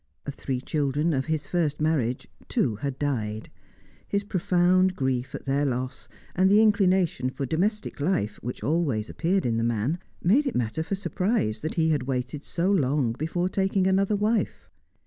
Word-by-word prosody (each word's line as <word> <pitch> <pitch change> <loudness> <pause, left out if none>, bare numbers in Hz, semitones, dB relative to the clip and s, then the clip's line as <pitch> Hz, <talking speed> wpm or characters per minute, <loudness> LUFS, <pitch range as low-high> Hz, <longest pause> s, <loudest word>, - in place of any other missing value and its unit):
Of 145 - -4
three 130 -2 -3
children 150 +3 0
of 135 +1 -1
his 155 -2 -1
first 155 -4 0
marriage, 145 -6 0 0.2
two 105 - +1
had 140 +2 -4
died; 110 -7 -2 0.6
his 200 0 0
profound 185 -1 +2
grief 130 -3 -1
at - - -8
their 140 +1 +1
loss, 130 -2 -3 0.3
and 185 +1 +4
the 205 +2 +6
inclination 190 -10 +3
for 135 +1 -4
domestic 200 - -1
life 145 - 0
which 125 +2 -6
always 140 -9 0
appeared 185 +3 0
in 115 -2 +1
the 115 - 0
man, 120 +8 0 0.2
made 255 - +4
it 270 - -2
matter 120 +5 -1
for 180 +5 -2
surprise 180 - -1
that 155 - -4
he 160 -1 +2
had 150 -3 +2
waited 130 +2 -3
so 180 +3 0
long 140 - +2
before 165 +8 -1
taking 190 0 +1
another 195 +2 +2
wife. 215 +2 0
155 Hz, 170 wpm, -26 LUFS, 130-185 Hz, 0.6 s, the